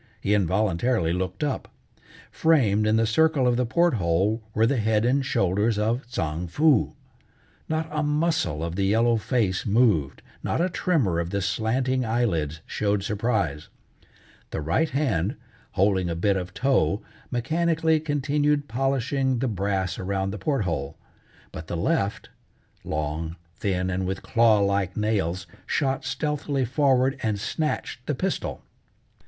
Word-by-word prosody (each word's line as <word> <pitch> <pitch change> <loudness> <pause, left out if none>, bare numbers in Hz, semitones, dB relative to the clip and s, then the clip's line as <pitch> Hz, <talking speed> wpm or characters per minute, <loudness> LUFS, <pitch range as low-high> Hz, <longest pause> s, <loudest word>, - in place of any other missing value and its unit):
He 105 -1 0
involuntarily 100 -1 +1
looked 95 +5 -3
up. 145 -3 -2 0.6
Framed 110 -10 +3
in 110 - +3
the 115 0 +3
circle 150 +4 +3
of 120 - +3
the 125 0 0
port 170 +7 +3
hole 95 +3 +1
were 110 - +4
the 130 +3 +1
head 110 0 +2
and 135 +3 +2
shoulders 105 -1 +1
of 115 +5 0
Tsang 80 -7 -3
Foo. 145 - +3 0.8
Not 160 0 -1
a 150 0 -1
muscle 150 - 0
of 85 0 -3
the 100 +1 0
yellow 115 +3 +3
face 110 -5 0
moved, 100 - +2 0.2
not - - -1
a 180 +2 +2
tremor 130 - +1
of 85 0 -2
the 100 +1 -1
slanting 115 +7 0
eyelids 85 -10 -1
showed 100 -1 -1
surprise. 100 - -1 0.8
The - - -4
right 85 - +1
hand, 110 - 0 0.4
holding 95 -2 +2
a 85 - -2
bit 100 +4 +1
of 90 -1 -3
tow, 110 - +1 0.3
mechanically 160 +5 +1
continued 145 -1 0
polishing 135 +1 0
the 130 +3 0
brass 95 -3 -1
around 95 0 -1
the 105 - -6
port 135 +2 0
hole, 75 -7 -3 0.5
but 80 - -8
the 85 - -3
left 110 - -1 0.5
long, 75 +2 -3 0.2
thin, 95 -2 -1
and 95 0 -1
with 95 0 -4
claw 115 -3 +4
like 100 -2 0
nails, 95 -4 0 0.2
shot 135 -2 0
stealthily 145 -1 -1
forward 135 0 +2
and 110 -4 -1
snatched 150 +8 -3
the - - 0
pistol. - - -3
110 Hz, 145 wpm, -25 LUFS, 95-135 Hz, 0.8 s, were